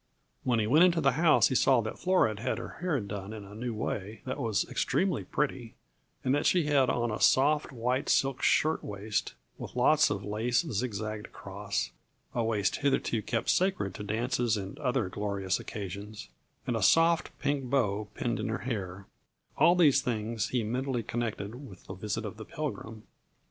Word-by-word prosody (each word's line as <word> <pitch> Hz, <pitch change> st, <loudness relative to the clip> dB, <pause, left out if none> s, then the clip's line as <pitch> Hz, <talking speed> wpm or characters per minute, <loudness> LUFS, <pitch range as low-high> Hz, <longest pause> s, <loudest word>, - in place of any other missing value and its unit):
When 125 Hz, -2 st, +2 dB
he 110 Hz, -, +1 dB
went 150 Hz, +10 st, +5 dB
into 175 Hz, -2 st, +4 dB
the 135 Hz, -3 st, +3 dB
house 155 Hz, +4 st, +4 dB
he -, -, -1 dB
saw 130 Hz, 0 st, +4 dB
that 110 Hz, -, -6 dB
Flora 170 Hz, -, +2 dB
had -, -, -1 dB
her -, -, -7 dB
hair 175 Hz, -6 st, +1 dB
done 100 Hz, -1 st, -6 dB
in 110 Hz, -2 st, -7 dB
a 100 Hz, -, -12 dB
new 115 Hz, +1 st, -4 dB
way 105 Hz, 0 st, -4 dB
that 130 Hz, +2 st, -4 dB
was 110 Hz, -7 st, 0 dB
extremely 185 Hz, -6 st, 0 dB
pretty, 130 Hz, -6 st, -2 dB, 0.5 s
and 130 Hz, -, +2 dB
that 145 Hz, +2 st, +2 dB
she 180 Hz, -2 st, +3 dB
had 140 Hz, -3 st, +3 dB
on 120 Hz, -1 st, 0 dB
a 105 Hz, -, -4 dB
soft, 150 Hz, +3 st, +4 dB
white 125 Hz, +2 st, -1 dB
silk 135 Hz, 0 st, +2 dB
shirt 155 Hz, +1 st, +2 dB
waist 105 Hz, +1 st, -3 dB, 0.2 s
with -, -, -8 dB
lots -, -, +4 dB
of -, -, -3 dB
lace 115 Hz, +4 st, +1 dB
zigzagged 110 Hz, -1 st, -3 dB
across -, -, -4 dB, 0.4 s
a 120 Hz, -, 0 dB
waist 105 Hz, -3 st, 0 dB
hitherto 135 Hz, -5 st, +1 dB
kept 115 Hz, +1 st, 0 dB
sacred 185 Hz, -, +1 dB
to -, -, -8 dB
dances 115 Hz, +2 st, 0 dB
and 95 Hz, -1 st, -6 dB
other 125 Hz, -6 st, 0 dB
glorious 100 Hz, -1 st, -2 dB
occasions 100 Hz, -, -7 dB, 0.4 s
and 120 Hz, -, -1 dB
a 115 Hz, -, -1 dB
soft, 165 Hz, -, +4 dB
pink 140 Hz, -1 st, -1 dB
bow 110 Hz, -6 st, 0 dB
pinned 120 Hz, -1 st, -2 dB
in -, -, -2 dB
her 110 Hz, -, -1 dB
hair; 100 Hz, -6 st, -4 dB, 0.5 s
all 175 Hz, -, +5 dB
these 145 Hz, -6 st, +5 dB
things 115 Hz, -4 st, -2 dB
he 125 Hz, -3 st, 0 dB
mentally 125 Hz, +2 st, -2 dB
connected 120 Hz, +3 st, -4 dB
with 95 Hz, -3 st, -14 dB
the -, -, -7 dB
visit 105 Hz, +2 st, -3 dB
of 110 Hz, -, -6 dB
the 110 Hz, -, -8 dB
Pilgrim. 115 Hz, -7 st, -6 dB
115 Hz, 180 wpm, -29 LUFS, 105-135 Hz, 0.5 s, went